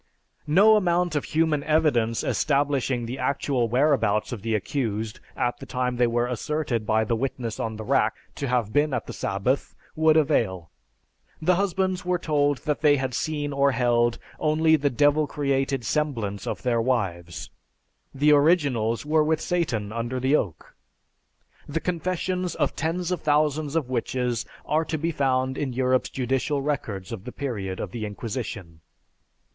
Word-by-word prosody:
No 205 +8 +6
amount 175 -3 +1
of 145 - 0
human 155 -2 +1
evidence 145 -8 +2
establishing 140 -4 0
the 125 +3 -5
actual 130 -2 0
whereabouts 125 -4 +2
of 120 -5 -5
the 115 +1 -1
accused 110 -1 -2 0.2
at 120 0 -1
the - - -9
time 125 -1 -1
they 120 0 +3
were 120 +1 +1
asserted 125 -2 -2
by 110 0 +3
the 115 +2 0
witness 120 -2 -3
on 110 -1 -2
the 110 - -6
rack - - +2 0.2
to 140 - -4
have 120 -4 0
been 145 -2 +2
at - - -3
the - - -7
sabbath 100 +8 -1 0.2
would 160 0 +4
avail. 110 - +1 0.7
The 180 +3 +3
husbands 190 0 0
were 180 0 +1
told 145 -4 +1
that 150 -1 -1
they 145 -1 +5
had 130 -1 -2
seen 145 +1 -2
or 140 0 +3
held 120 -1 +2 0.2
only 160 +1 +3
the 145 -1 +1
devil 145 +4 +3
created 135 -3 -1
semblance 115 -9 -2
of - - -4
their 120 -2 +2
wives. 95 - -2 0.6
The 145 +2 +3
originals 145 -7 +3
were 155 +1 +3
with 155 0 +1
Satan 120 - -1
under 120 +2 -3
the 130 +3 +3
oak. 90 - -3 1.0
The 155 +3 -1
confessions 180 +1 -2
of - - 0
tens 175 +2 -2
of 180 - -1
thousands 150 0 +1
of 160 -6 0
witches 125 -1 -2 0.2
are 155 +2 +1
to 160 0 -3
be 165 +3 -1
found 130 -2 0
in 135 -3 -2
Europe's 130 0 +1
judicial 135 +3 -1
records 115 -11 -3
of 110 -5 -6
the 125 - -6
period 105 -10 -4
of 95 - -4
the 115 0 -5
Inquisition. 105 -6 -6
135 Hz, 160 wpm, -25 LUFS, 115-155 Hz, 1.0 s, No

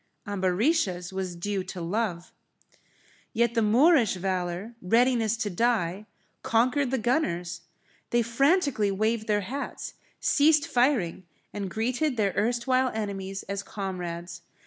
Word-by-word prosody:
Ambarisha's 190 - 0
was 190 -2 -3
due 195 +2 -2
to 185 -1 -7
love. 175 0 -2 1.0
Yet 235 0 +2
the 230 - +2
Moorish 240 - +4
valour, 185 +3 -3
readiness 230 +2 +2
to 210 -2 -2
die, 210 -2 0 0.3
conquered 255 +4 +2
the 265 - 0
gunners. 175 - -1 0.5
They 240 0 +2
frantically 275 - +2
waved 215 +3 0
their 210 -1 +2
hats, 265 +9 -5 0.3
ceased 295 0 +4
firing, 240 - +1 0.3
and 200 -2 -4
greeted 245 +6 -1
their 200 -3 +1
erstwhile 245 +3 +1
enemies 195 -2 -4
as 200 0 -4
comrades. 175 -4 -5
215 Hz, 120 wpm, -27 LUFS, 185-245 Hz, 1.0 s, Moorish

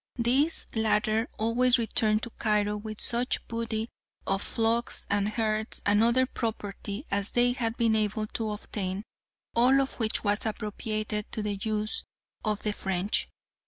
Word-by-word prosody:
These 265 +7 +4
latter 220 +1 +1
always 240 +3 +3
returned 220 -2 +1
to 235 - -5
Cairo 210 -2 +1
with 215 0 -6
such 240 +1 0
booty 230 -1 -2 0.4
of 195 0 0
flocks 230 +3 0
and 205 0 +2
herds 215 0 -1
and 205 +2 +4
other 245 +3 +4
property 215 -1 -4
as 200 0 0
they 245 0 +4
had 235 -2 -2
been 230 -2 +3
able 215 0 0
to 220 +1 -3
obtain, 200 -2 -4 0.5
all 255 +3 +5
of 270 -1 -2
which 220 -2 +1
was 205 0 +3
appropriated 215 0 -3
to 215 - -2
the 210 -1 -1
use 215 0 -1 0.4
of 215 -2 -1
the 210 - 0
French. 195 0 -1
220 Hz, 150 wpm, -28 LUFS, 210-235 Hz, 0.5 s, all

